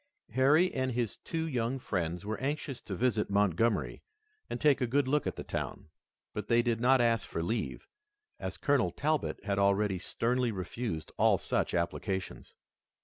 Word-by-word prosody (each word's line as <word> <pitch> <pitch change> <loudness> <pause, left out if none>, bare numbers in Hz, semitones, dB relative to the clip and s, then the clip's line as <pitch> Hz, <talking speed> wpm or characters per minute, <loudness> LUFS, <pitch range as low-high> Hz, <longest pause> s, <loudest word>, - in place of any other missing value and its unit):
Harry 150 +8 +4
and 130 -1 -1
his 120 -3 -1
two 160 -1 -3
young 125 -2 -1
friends 90 -7 -2
were 110 +1 -3
anxious 140 -1 -3
to 100 - -5
visit 115 -1 +1
Montgomery 100 +2 +1 0.5
and - - -3
take 145 -3 +4
a 125 - +2
good 135 +3 +2
look 150 +2 +1
at - - -2
the - - -6
town, - - -5 0.4
but 105 -1 -4
they 120 0 +4
did 115 -1 0
not 130 +2 +5
ask 115 -3 +2
for 85 - -2
leave, 110 +6 -3 0.5
as - - -4
Colonel 140 - +2
Talbot 150 - -1
had 100 -1 0
already 100 -1 +2
sternly 120 +5 0
refused 95 -3 -4
all - - +5
such - - -1
applications. 95 +2 -3
115 Hz, 165 wpm, -31 LUFS, 100-130 Hz, 0.5 s, not